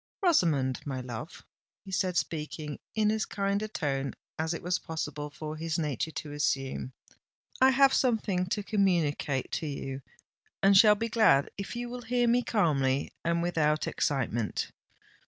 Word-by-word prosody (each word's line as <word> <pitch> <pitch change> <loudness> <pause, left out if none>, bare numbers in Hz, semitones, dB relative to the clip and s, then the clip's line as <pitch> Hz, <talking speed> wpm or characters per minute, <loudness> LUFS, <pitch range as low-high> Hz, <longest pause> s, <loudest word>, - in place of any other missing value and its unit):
"Rosamond, 155 - +3
my 135 -3 -4
love," 125 +4 -7 0.4
he 190 - -9
said, 185 -1 0
speaking 150 -2 -3 0.2
in 215 -1 +3
as 220 0 0
kind 200 0 -1
a 215 - -2
tone 140 -8 -2 0.2
as 160 +1 0
it 165 - -4
was 180 +1 0
possible 150 -3 -4
for 155 +1 -6
his 160 0 -2
nature 150 -2 -1
to 155 -1 -6
assume, 135 -3 -1 0.7
"I 260 - +8
have 270 +1 +5
something 210 -7 +1
to 205 +2 -1
communicate 170 - +1
to 160 - -2
you, 135 -1 -5 0.6
and 195 0 +6
shall 210 +2 +8
be 225 +2 -2
glad 215 -12 +4
if 200 +4 -6
you 240 0 -3
will 245 +1 -6
hear 245 +1 +1
me 240 +1 +4
calmly 140 - +1
and 170 0 +1
without 155 -3 +1
excitement. 120 -6 -1
165 Hz, 155 wpm, -29 LUFS, 145-210 Hz, 0.7 s, I